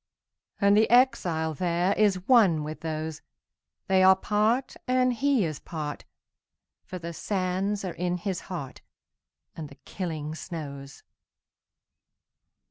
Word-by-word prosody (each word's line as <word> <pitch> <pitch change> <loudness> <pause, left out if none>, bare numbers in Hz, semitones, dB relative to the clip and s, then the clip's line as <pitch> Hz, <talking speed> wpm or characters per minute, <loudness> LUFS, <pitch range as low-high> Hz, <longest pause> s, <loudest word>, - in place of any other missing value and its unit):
And 200 0 +4
the 220 +1 +4
exile 185 -11 +3
thereIs 185 +5 +1
one 200 -12 +5
with 155 +1 -6
those; 155 -1 -4 0.6
They 190 -1 +3
are 190 0 +7
part, 215 +6 0
and 255 0 +2
he 265 -3 +2
is 155 -3 -4
part, 150 -3 -6 0.8
For 185 - -7
the 170 -1 -7
sands 195 +2 -2
are 180 - -4
in 180 0 -2
his 185 0 -3
heart, 155 -8 -6 0.7
And 155 -3 -7
the 140 - -15
killing 155 -5 -4
snows. 140 -5 -8
180 Hz, 120 wpm, -27 LUFS, 160-205 Hz, 0.8 s, are